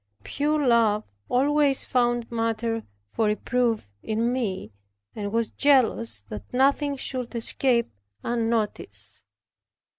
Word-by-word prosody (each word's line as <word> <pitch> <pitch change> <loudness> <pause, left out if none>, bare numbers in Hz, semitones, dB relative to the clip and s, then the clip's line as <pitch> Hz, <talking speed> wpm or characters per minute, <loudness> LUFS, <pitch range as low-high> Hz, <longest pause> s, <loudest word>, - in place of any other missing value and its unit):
Pure 295 0 0
love 220 -3 +4 0.3
always 280 +2 +3
found 240 -2 +1
matter 225 0 -1 0.3
for 225 - +1
reproof 225 - 0
in 230 +3 0
me, 195 - -2 0.4
and 205 -1 -4
was 230 0 0
jealous 225 - +2
that 100 +1 -9
nothing 280 +2 +2
should 255 -2 -3
escape 235 +1 +1 0.3
unnoticed. 210 - -2
235 Hz, 100 wpm, -25 LUFS, 215-255 Hz, 0.4 s, love